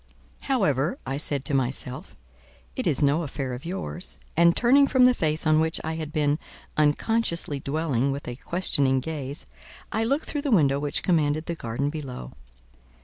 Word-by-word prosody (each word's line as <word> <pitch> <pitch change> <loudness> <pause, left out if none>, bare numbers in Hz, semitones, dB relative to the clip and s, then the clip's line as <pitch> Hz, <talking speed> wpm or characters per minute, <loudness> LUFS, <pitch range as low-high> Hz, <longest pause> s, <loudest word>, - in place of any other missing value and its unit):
"However," 175 - +1
I 135 +1 -2
said 145 -2 -1
to - - -2
myself, 130 -1 -2 0.6
"it - - -2
is 150 -1 +2
no 145 +4 +3
affair 135 -4 -4
of 125 +4 -7
yours;" 180 0 -4 0.2
and 170 +1 +5
turning 275 +4 +5
from 260 -3 +5
the 250 - +6
face 155 -7 -1
on 155 0 +4
which 160 0 0
I 160 - -2
had 160 -2 -5
been 150 0 +1 0.4
unconsciously 160 0 +1
dwelling 140 -2 0
with 140 +1 -5
a 120 - -4
questioning 140 -5 +1
gaze, 145 -1 -5 0.5
I 220 - 0
looked 275 +7 0
through 295 - -2
the 285 - -2
window 140 - +4
which 145 0 -2
commanded 155 -3 +1
the 170 - -2
garden 140 0 -2
below. 130 - -6
150 Hz, 170 wpm, -26 LUFS, 140-170 Hz, 0.6 s, the